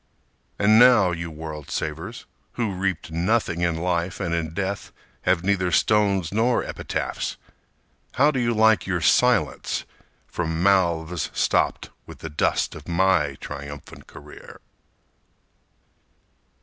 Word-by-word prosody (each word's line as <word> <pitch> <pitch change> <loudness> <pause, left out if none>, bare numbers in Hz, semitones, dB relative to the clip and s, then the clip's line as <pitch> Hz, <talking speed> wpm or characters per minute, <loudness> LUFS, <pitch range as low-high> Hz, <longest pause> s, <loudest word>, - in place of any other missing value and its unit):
_ - - -45 0.6
And 110 +2 +6
now, 120 -7 +6
you 85 0 -4
world 75 -1 -8
savers, 80 +10 -5 0.3
who 115 -5 -2
reaped 95 -3 -3
nothing 85 +1 0
in 85 -1 +1
life 85 +1 -2
And 85 - -2
in 80 -1 -2
death 100 0 -3 0.4
have 90 -2 +2
neither 95 -2 +1
stones 100 -4 +2
nor 115 +4 +1
epitaphs, - - -4 0.8
How 145 +3 +4
do 135 - -2
you 120 -1 +1
like 110 -2 +3
your 90 -3 -1
silence 80 - +2 0.4
from 80 0 -3
mouths 85 -4 +1
stopped - - 0 0.2
With - - -11
the 80 - -8
dust 75 - 0
of - - -11
my 85 -5 +2
triumphant 70 0 -9
career? - - -13
90 Hz, 125 wpm, -24 LUFS, 80-105 Hz, 0.8 s, And